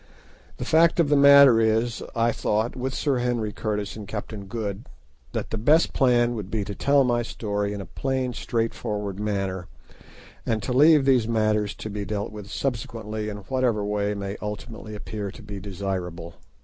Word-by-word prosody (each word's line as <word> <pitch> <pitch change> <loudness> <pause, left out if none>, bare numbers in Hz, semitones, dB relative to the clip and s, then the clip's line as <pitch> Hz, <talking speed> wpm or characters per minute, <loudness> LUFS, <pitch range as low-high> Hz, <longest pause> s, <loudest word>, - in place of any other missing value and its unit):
The 125 - -4
fact 165 +4 +4
of 160 -4 +3
the 145 - +4
matter 140 -4 +8
is, 110 +1 +1
I 115 0 +2
thought, 110 +1 -1
with 130 +1 -3
Sir 140 -4 0
Henry 120 -3 -1
Curtis 105 -2 -3
and 105 -2 -8
Captain 105 -1 -6
Good, 105 -1 -5 0.4
that - - -3
the 110 - -2
best 150 +9 +4
plan 120 -3 +3
would 105 -5 -5
be 105 -1 -1
to 100 - -5
tell 140 +6 +3
my 120 -2 +1
story 105 -3 -2
in 100 -1 -4
a - - -7
plain, 130 +5 -2
straightforward 105 -4 -3
manner, 95 -3 -2 0.8
and 110 -2 -1
to 125 - -2
leave 150 +1 +6
these 130 -5 +3
matters 110 -2 +1
to 110 - -7
be 105 0 -4
dealt 100 +1 -3
with 105 -1 -9
subsequently 110 -4 -3
in 105 - -5
whatever 125 -6 +1
way 100 -1 -2
ultimately 110 +1 -6
may - - -5
appear 105 -1 -5
to 110 +4 -12
be 100 -1 -7
desirable. 90 -3 -5
110 Hz, 175 wpm, -25 LUFS, 105-125 Hz, 0.8 s, matter